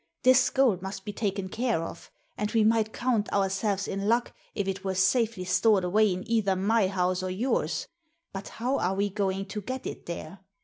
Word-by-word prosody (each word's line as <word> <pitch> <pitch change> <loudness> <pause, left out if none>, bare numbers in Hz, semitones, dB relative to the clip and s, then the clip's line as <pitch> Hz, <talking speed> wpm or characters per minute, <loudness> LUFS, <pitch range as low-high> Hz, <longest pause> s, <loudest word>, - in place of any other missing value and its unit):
This 255 0 +6
gold 245 -9 +2
must 190 0 -6
be 205 - -4
taken 200 -3 -2
care 225 -4 -1
of, 165 - -8 0.3
and 210 - -2
we 225 -2 +4
might 220 0 +3
count 235 -4 0
ourselves 195 0 0
in 195 +1 -3
luck 235 +1 +1 0.2
if 200 -2 -1
it 195 0 -3
were 190 -1 -2
safely 215 +1 +2
stored 185 +2 +3
away 210 +3 +3
in 185 +3 -4
either 220 -4 +2
my 200 +2 +2
house 185 -1 0
or 185 - -3
yours; 220 +9 -1 0.5
but 195 0 -6
how 255 +4 0
are 185 +2 0
we 200 +1 0
going 195 -1 -1
to 210 +1 -5
get 255 +5 -5
it - - -7
there? 170 +2 -6
200 Hz, 195 wpm, -28 LUFS, 190-225 Hz, 0.5 s, This